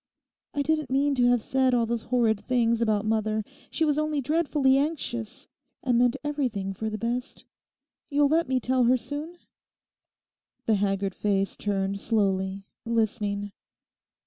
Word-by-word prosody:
I 285 Hz, -, +1 dB
didn't 305 Hz, -2 st, 0 dB
mean 280 Hz, +2 st, +2 dB
to 245 Hz, -2 st, +3 dB
have 245 Hz, -2 st, +3 dB
said 260 Hz, -1 st, +2 dB
all 235 Hz, -1 st, +2 dB
those 235 Hz, 0 st, -2 dB
horrid 230 Hz, -4 st, +1 dB
things 235 Hz, -2 st, +1 dB
about 215 Hz, -2 st, +1 dB
mother. 215 Hz, 0 st, 0 dB, 0.3 s
She 320 Hz, -, 0 dB
was 300 Hz, -1 st, +1 dB
only 305 Hz, -1 st, 0 dB
dreadfully 290 Hz, -1 st, +2 dB
anxious 270 Hz, -4 st, -2 dB, 0.4 s
and 245 Hz, -3 st, +2 dB
meant 245 Hz, -1 st, +3 dB
everything 250 Hz, -10 st, -2 dB
for 220 Hz, +3 st, -3 dB
the 215 Hz, -, -4 dB
best. 240 Hz, +4 st, -4 dB, 0.6 s
You'll 290 Hz, -1 st, +3 dB
let 320 Hz, +2 st, +2 dB
me 260 Hz, -1 st, +2 dB
tell 255 Hz, +1 st, +2 dB
her 255 Hz, +2 st, +4 dB
soon?' 300 Hz, +7 st, -6 dB, 1.3 s
The 225 Hz, -, +3 dB
haggard 195 Hz, -1 st, 0 dB
face 195 Hz, -1 st, 0 dB
turned 200 Hz, -1 st, -2 dB
slowly, 195 Hz, -3 st, 0 dB, 0.2 s
listening. 210 Hz, -3 st, -1 dB
240 Hz, 145 wpm, -26 LUFS, 210-275 Hz, 1.3 s, her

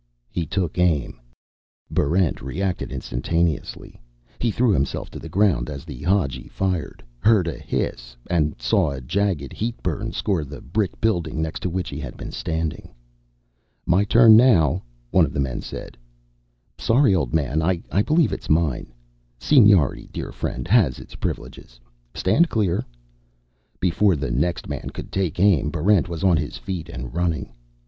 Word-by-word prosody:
He 85 Hz, -3 st, -2 dB
took 90 Hz, -1 st, -2 dB
aim. 80 Hz, -7 st, +1 dB, 0.7 s
Barrent 85 Hz, +3 st, +1 dB
reacted 90 Hz, +7 st, -3 dB
instantaneously. 80 Hz, +4 st, -2 dB, 0.4 s
He 120 Hz, -, +1 dB
threw 115 Hz, +1 st, +2 dB
himself 70 Hz, -7 st, -1 dB
to -, -, -8 dB
the 80 Hz, -, -9 dB
ground 90 Hz, -10 st, +2 dB
as 70 Hz, +1 st, -7 dB
the 70 Hz, -7 st, -9 dB
Hadji 90 Hz, -8 st, 0 dB
fired, 95 Hz, -4 st, -3 dB, 0.2 s
heard 105 Hz, -, +4 dB
a 85 Hz, -, -4 dB
hiss, -, -, -4 dB
and 75 Hz, -6 st, 0 dB
saw 60 Hz, +5 st, +2 dB
a 70 Hz, -2 st, -5 dB
jagged 80 Hz, 0 st, -1 dB
heatburn 115 Hz, -1 st, -3 dB
score 95 Hz, -9 st, -1 dB
the 70 Hz, 0 st, -9 dB
brick 105 Hz, -4 st, -2 dB
building 85 Hz, -8 st, 0 dB
next 80 Hz, 0 st, -2 dB
to 90 Hz, -, -2 dB
which 90 Hz, 0 st, -3 dB
he 70 Hz, -, -6 dB
had 65 Hz, -6 st, -7 dB
been -, -, -7 dB
standing. 80 Hz, -2 st, -3 dB, 1.0 s
"My 95 Hz, +3 st, +3 dB
turn 115 Hz, +1 st, +7 dB
now," 110 Hz, -, +5 dB, 0.3 s
one -, -, +5 dB
of -, -, -1 dB
the -, -, -2 dB
men 65 Hz, -3 st, -1 dB
said. -, -, -8 dB, 0.8 s
"Sorry, 120 Hz, -2 st, +4 dB
old 90 Hz, -, 0 dB
man, 75 Hz, 0 st, +1 dB
I 90 Hz, +2 st, +1 dB, 0.2 s
believe 155 Hz, +7 st, +2 dB
it's -, -, -6 dB
mine." 75 Hz, -6 st, +1 dB, 0.5 s
"Seniority, 105 Hz, -, +4 dB
dear -, -, -5 dB
friend, 65 Hz, -, -4 dB
has 95 Hz, -, +3 dB
its -, -, -12 dB
privileges. -, -, -6 dB, 0.4 s
Stand 160 Hz, -, +3 dB
clear." 100 Hz, -6 st, 0 dB, 1.0 s
Before 90 Hz, +2 st, +3 dB
the 70 Hz, -4 st, -3 dB
next 85 Hz, +8 st, -1 dB
man -, -, -5 dB
could -, -, -7 dB
take 95 Hz, -4 st, -1 dB
aim, 90 Hz, -7 st, +4 dB
Barrent 90 Hz, +4 st, +2 dB
was 85 Hz, 0 st, -5 dB
on 90 Hz, -4 st, +4 dB
his 75 Hz, -1 st, -3 dB
feet 90 Hz, -4 st, -5 dB
and 60 Hz, 0 st, -7 dB
running. 85 Hz, -7 st, -1 dB
85 Hz, 155 wpm, -23 LUFS, 75-100 Hz, 1.0 s, turn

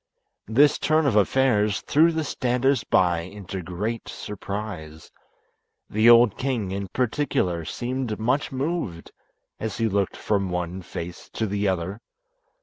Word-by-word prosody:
This 140 Hz, +7 st, +4 dB
turn 155 Hz, 0 st, +2 dB
of 130 Hz, -6 st, +2 dB
affairs 105 Hz, -2 st, +3 dB
threw 160 Hz, +3 st, +4 dB
the 160 Hz, -1 st, -1 dB
standers 125 Hz, -2 st, +1 dB
by 90 Hz, -4 st, +3 dB
into 95 Hz, +2 st, -7 dB
great 105 Hz, +7 st, -4 dB
surprise. 100 Hz, -7 st, -6 dB, 0.8 s
The 110 Hz, +3 st, +5 dB
old 120 Hz, -3 st, +6 dB
king 120 Hz, -8 st, -1 dB
in 100 Hz, 0 st, -3 dB
particular 110 Hz, -, -1 dB
seemed 125 Hz, -1 st, -3 dB
much 130 Hz, +7 st, 0 dB
moved 135 Hz, -, -3 dB, 0.5 s
as 110 Hz, -3 st, -4 dB
he 115 Hz, -, +1 dB
looked 100 Hz, -2 st, 0 dB
from 100 Hz, -3 st, 0 dB
one 90 Hz, +1 st, -3 dB
face 85 Hz, 0 st, -7 dB
to 110 Hz, -, -1 dB
the 100 Hz, 0 st, -1 dB
other. 95 Hz, +3 st, -2 dB
105 Hz, 135 wpm, -24 LUFS, 95-125 Hz, 0.8 s, old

